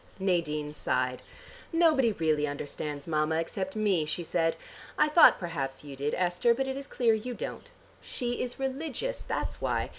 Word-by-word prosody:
Nadine 160 -6 0
sighed. 125 -3 -1 0.5
"Nobody 315 -8 +4
really 155 -4 +1
understands 145 0 -5
Mama 155 -1 +1
except 185 +4 -2
me," 205 -6 +2
she 155 +3 -3
said. 165 0 0 0.4
"I - - +5
thought 315 +2 +8
perhaps 145 -7 -4
you 140 -2 -8
did, 140 +2 -1
Esther, 180 +6 +2
but 270 - 0
it 265 0 -3
is 275 0 -6
clear 235 -3 +2
you 235 +3 -3
don't. - - -6 0.3
She 245 -2 -3
is 245 -1 -4
religious, 290 - -3
that's - - -3
why. - - 0
180 Hz, 160 wpm, -29 LUFS, 150-245 Hz, 0.5 s, thought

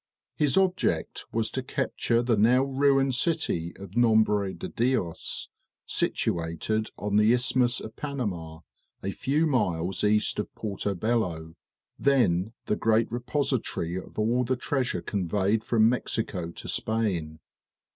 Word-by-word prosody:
His 150 +4 +2
object 190 -1 +1
was 115 -1 -1
to 130 - -2
capture 125 -2 0
the 120 -1 +2
now 120 +5 +4
ruined 135 0 +2
city 125 - 0
of 100 0 -10
Nombre 110 -4 +3
de - - -6
Dios, 115 -9 -1 0.4
situated 85 +7 -1
on 105 0 0
the 105 +1 +5
Isthmus 125 0 +2
of 110 - -9
Panama, 95 - -4 0.4
a 100 - -1
few 145 +10 0
miles 95 - 0
east 105 +1 +2
of 105 - -3
Porto 100 -1 -3
Bello, 90 -7 -1 0.5
then 110 -8 +2
the - - +1
great 115 +1 +2
repository 125 - -1
of 95 - -7
all 115 +4 +2
the 130 +1 0
treasure 125 -8 -1
conveyed 100 +3 0
from 110 -1 +4
Mexico 110 -7 -1
to 85 - -9
Spain. 90 -9 -1
110 Hz, 130 wpm, -27 LUFS, 95-125 Hz, 0.5 s, the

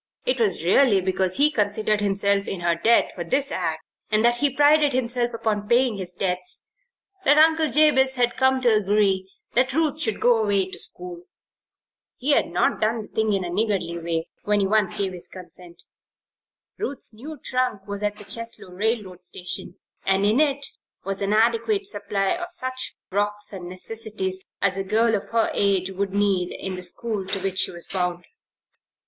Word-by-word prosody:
It 255 0 0
was 190 -7 +1
really 205 +2 +4
because 185 0 0
he 295 +2 +4
considered 210 -2 0
himself 200 0 +1
in 190 - -4
her 170 0 +2
debt 220 +8 +3
for 175 - -5
this 270 +11 +1
act, 160 -3 -2 0.3
and 215 +1 +2
that 240 0 +4
he 285 +3 +2
prided 290 +1 +4
himself 245 -1 0
upon 210 -2 -2
paying 240 -1 +2
his 185 -2 +2
debts, 180 -1 -2 0.6
that 290 - +5 0.4
Jabez 270 -3 +4
Potter 245 -1 +4
had 240 - -14
come 265 0 +2
to 240 -3 +4
agree 195 -2 +1 0.2
that 255 +1 +2
Ruth 315 0 0
should 220 -7 -1
go 240 -2 +4
away 200 -3 +1
to - - 0
school. 175 -1 -3 0.9
He 275 +4 +1
had - - +3
not 175 - 0
done 220 +1 0
the - - -14
thing 220 -1 0
in 195 -2 0
a 175 - -4
niggardly 185 -4 -1
way, 165 0 -2
when 205 -2 +1
once 215 -4 +2
he - - -1
gave 190 -1 -3
his 180 - -9
consent. 180 -2 -12 1.0
Ruth's 285 - -2
new 290 +8 -9
trunk 250 -6 -2
was 200 0 -5
at 210 0 -1
the 210 - -11
Cheslow 230 -3 -3
railroad 205 -2 -2
station 180 0 -5 0.3
and 195 +1 +2
in 215 +6 +3
it 285 -2 +2 0.4
was 195 0 -3
an 200 0 0
adequate 235 - +2
supply 200 - 0
of 350 0 -3
such 260 -7 -4 0.2
frocks 205 +1 -1
and 180 -2 -7
necessities 190 -1 -4 0.2
as 195 -1 +2
a 195 - -1
girl 225 +4 +2
of 205 - -1
her 230 -1 +1
age 195 -2 +1
would 195 +1 -2
need 195 -3 +1
in 190 - -5
the 180 - -6
school 195 +2 -3
to 195 - -2
which 190 -1 +1
she - - +3
was 170 -1 -1
bound. 180 -2 -2
205 Hz, 185 wpm, -23 LUFS, 190-240 Hz, 1.0 s, that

